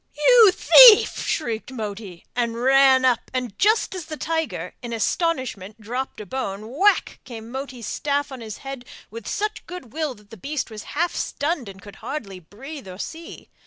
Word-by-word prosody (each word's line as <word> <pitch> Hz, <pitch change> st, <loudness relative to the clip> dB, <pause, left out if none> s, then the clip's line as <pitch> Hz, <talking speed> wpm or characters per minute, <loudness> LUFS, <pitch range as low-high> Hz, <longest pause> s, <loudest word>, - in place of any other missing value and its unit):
'You 450 Hz, +7 st, +7 dB
thief!' 465 Hz, +3 st, +7 dB
shrieked 235 Hz, -5 st, -3 dB
Moti, 210 Hz, -6 st, -7 dB
and 235 Hz, -1 st, -1 dB
ran 265 Hz, 0 st, +5 dB
up 250 Hz, -2 st, +1 dB
and, 250 Hz, -5 st, -3 dB
just 430 Hz, 0 st, +2 dB
as 365 Hz, -4 st, -6 dB
the 310 Hz, -1 st, -7 dB
tiger, 320 Hz, 0 st, -3 dB
in 240 Hz, -2 st, -6 dB
astonishment, 230 Hz, -, -2 dB
dropped 245 Hz, +5 st, -5 dB
a 210 Hz, -, -7 dB
bone 215 Hz, 0 st, -5 dB
whack! 400 Hz, +6 st, +2 dB
came 230 Hz, -2 st, -10 dB
Moti's 260 Hz, -3 st, -6 dB
staff 285 Hz, +3 st, -2 dB
on 260 Hz, -2 st, -8 dB
his 215 Hz, -3 st, -7 dB
head 270 Hz, -2 st, -6 dB, 0.3 s
with 230 Hz, -1 st, -9 dB
such 425 Hz, +1 st, -3 dB
good 355 Hz, -10 st, -9 dB
will 310 Hz, -4 st, -3 dB
that 205 Hz, -1 st, -22 dB
the 225 Hz, -, -10 dB
beast 275 Hz, +3 st, -4 dB
was 215 Hz, -1 st, -7 dB, 0.2 s
half 345 Hz, +2 st, +1 dB
stunned 290 Hz, -, -3 dB
and 190 Hz, 0 st, -13 dB
could 205 Hz, -2 st, -12 dB
hardly 200 Hz, -11 st, -6 dB
breathe 260 Hz, -, -11 dB
or 185 Hz, -1 st, -9 dB
see. 325 Hz, -, -9 dB
260 Hz, 175 wpm, -23 LUFS, 220-310 Hz, 0.3 s, You